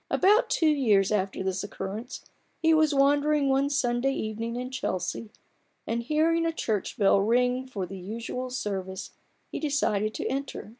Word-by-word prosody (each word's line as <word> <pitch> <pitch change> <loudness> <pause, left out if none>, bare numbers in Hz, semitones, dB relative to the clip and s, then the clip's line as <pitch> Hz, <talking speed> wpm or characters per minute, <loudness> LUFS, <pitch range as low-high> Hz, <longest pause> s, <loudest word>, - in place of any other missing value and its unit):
About 435 +5 +4
two 330 - +1
years 225 -11 +3
after 195 -2 -1
this 190 0 -2
occurrence 205 +4 -6 0.3
he 325 0 +4
was 315 -1 +4
wandering 285 +1 +3
one 270 +1 +2
Sunday 265 -1 +1
evening 225 0 -4
in 250 +1 -4
Chelsea, 210 -4 -3 0.6
and 235 +1 -1
hearing 315 +6 +2
a 330 - +1
church 220 -10 -2
bell 200 -2 +4
ring 250 +4 +1
for 200 -7 -4
the 190 +1 -8
usual 230 +6 -5
service, 195 -6 -4 0.4
he - - -4
decided 215 -8 0
to - - -4
enter. 275 -4 -4
245 Hz, 155 wpm, -27 LUFS, 205-285 Hz, 0.6 s, About